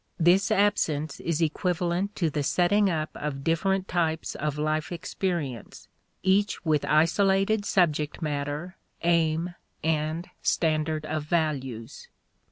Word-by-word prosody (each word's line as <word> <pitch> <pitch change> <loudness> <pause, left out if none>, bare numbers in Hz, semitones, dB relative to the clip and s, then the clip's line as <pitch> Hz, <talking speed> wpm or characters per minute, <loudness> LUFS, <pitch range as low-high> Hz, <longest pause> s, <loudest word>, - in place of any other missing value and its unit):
This 180 +4 +4
absence 155 -7 +1
is 165 0 0
equivalent 175 +4 -1
to 165 -4 0
the 150 - -1
setting 195 +7 +3
up 155 -3 -2
of 140 -2 -4
different 190 +4 +1
types 165 -2 -1
of 150 0 -3
life 155 +2 -1
experience, 170 - -4 0.4
each 195 0 +2
with 155 -2 +2
isolated 195 +6 +3
subject 155 -7 +1
matter, 150 +4 -3 0.3
aim, 170 0 +2 0.3
and 160 +2 -1
standard 155 -1 0
of 155 -1 -3
values. 145 - -2
160 Hz, 115 wpm, -27 LUFS, 150-180 Hz, 0.4 s, This